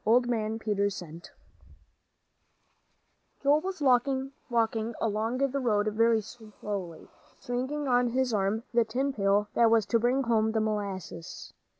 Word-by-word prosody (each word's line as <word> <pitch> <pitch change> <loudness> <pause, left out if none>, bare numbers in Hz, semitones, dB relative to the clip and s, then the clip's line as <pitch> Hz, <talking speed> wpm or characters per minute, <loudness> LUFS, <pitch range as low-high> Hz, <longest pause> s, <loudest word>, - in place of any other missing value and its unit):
XV - - -11
OLD 240 +2 +4
MAN 220 -2 -1
PETERS' 205 -3 -1
CENT 170 0 -9 2.1
Joel 290 +2 +4
was 370 -2 -5
walking 265 +1 +2 0.7
along 225 +2 -1
the 275 0 0
road 215 -5 +1
very 225 +1 +3
slowly, 205 -6 -7 0.3
swinging 260 +4 -3
on 245 -1 +3
his 250 0 0
arm 205 +2 0
the 235 0 +4
tin 260 +5 -2
pail 200 -1 +2
that 235 -1 +4
was 225 -2 +3
to 230 +2 +2
bring 250 +4 +1
home 220 -2 +1
the 220 - +1
molasses. 200 -5 -4
225 Hz, 135 wpm, -28 LUFS, 210-250 Hz, 2.1 s, OLD